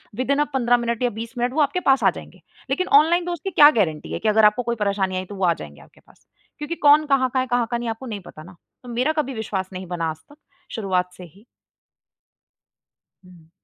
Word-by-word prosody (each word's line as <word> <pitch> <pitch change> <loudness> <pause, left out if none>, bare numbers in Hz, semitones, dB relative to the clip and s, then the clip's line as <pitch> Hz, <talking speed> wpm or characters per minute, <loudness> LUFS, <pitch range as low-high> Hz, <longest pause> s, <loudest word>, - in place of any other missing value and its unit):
Within 260 +4 0
अ, - - +4
15 245 -2 +2
minute 235 0 -3
या 245 - +2
20 230 +2 -8
minute 245 +1 -1
वो 305 - +1
आपके 290 +5 +1
पास 270 -6 +2
आ - - +6
जाएँगे। - - -13 0.3
लेकिन 370 - -1
ऑनलाइन 340 +3 0
दोस्त 345 -3 -5
की 390 - -2
क्या 295 -3 +8
गारंटी 160 -6 -1
है - - -3
कि 220 - 0
अगर 215 0 +4
आपको 210 +4 +3
कोई 235 0 -2
परेशानी 200 -3 -1
आई 185 - -4
तो 205 - -10
वो 190 -1 -1
आ 170 - +3
जाएँगे 75 - -11
आपके - - -21
पास, - - -26 0.3
क्योंकि 295 +3 -5
कौन 300 0 +5
कहाँ 275 -3 +2
का 260 - +1
है? 255 - 0
कहाँ 245 -2 0
का 240 - 0
नहीं 235 -1 -4
आपको 225 +4 -6
नहीं 215 -5 -5
पता 155 - -12
ना? 180 +2 -14 0.3
तो 250 - -11
मेरा 250 +5 0
कभी 275 -3 -1
विश्वास 200 -5 -4
नहीं 185 +1 -7
बना 170 -2 -3
आज 155 - -6
तक 290 - -16 0.4
शुरुआत 185 -4 -1
से 185 - -10
ही। 190 +6 -17 1.8
हुँ। 170 -3 -18
235 Hz, 240 wpm, -22 LUFS, 190-270 Hz, 1.8 s, क्या